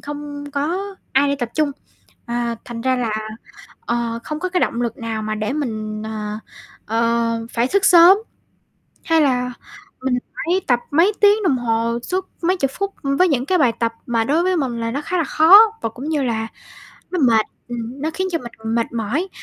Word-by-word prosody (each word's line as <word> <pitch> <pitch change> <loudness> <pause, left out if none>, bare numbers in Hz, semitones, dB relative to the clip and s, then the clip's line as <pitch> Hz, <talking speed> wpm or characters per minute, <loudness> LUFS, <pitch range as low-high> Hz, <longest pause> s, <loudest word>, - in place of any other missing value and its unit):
không 290 0 -7
có 290 +6 -1 0.3
ai 280 +2 +3
đi 280 - 0
tập 245 -4 -3
chung, 305 -2 +1 0.6
à, 235 0 -2
thành 235 -1 -7
ra 260 +2 +1
là, 235 -3 -1 0.7
ờ, 235 -1 -2
không 305 - -4
có 370 - -1
cái 365 0 0
động 235 - 0
lực 235 -2 -2
nào 225 -2 -4
mà 215 0 -2
để 215 +3 -2
mình, 215 -7 -3
ờ, 215 -1 -4 0.5
ờ, 230 0 0
phải 235 +2 +1
xức 400 +6 +1
sớm. 350 +1 +8 0.9
Hay 325 -1 +3
là 250 -3 +1 0.5
mình 260 -1 0 0.2
phải 360 +3 0
tập 245 -2 +3
mấy 335 +8 +4
tiếng 415 +1 +5
đồng 300 -9 +2
hồ 230 0 0
suốt 370 +5 -3
mấy 365 +3 +2
chục 275 -6 0
phút, 395 0 -2
ưm, 275 0 0
với 365 - +5
những 265 -6 0
cái 370 +5 +2
bài 265 -8 +4
tập 230 -1 0
mà 230 -2 +1
đối 305 +8 +1
với 370 0 +1
mình 255 -6 -2
là 230 0 -2
nó 280 +4 -2
khá 360 +4 -2
là 335 - +2
khó 320 +6 +7 0.2
và 225 - -1
cũng 255 +7 -7
như 300 -3 0
là 225 -3 -1 0.6
nó 365 - -2
mệt, 230 -7 +4 0.2
ừm, 240 +3 -6
nó 315 - 0
khiến 375 +2 -1
cho 330 - +1
mình 225 -4 -6
mệt 230 0 -1
mỏi, 240 - -2
255 Hz, 205 wpm, -20 LUFS, 230-320 Hz, 0.9 s, sớm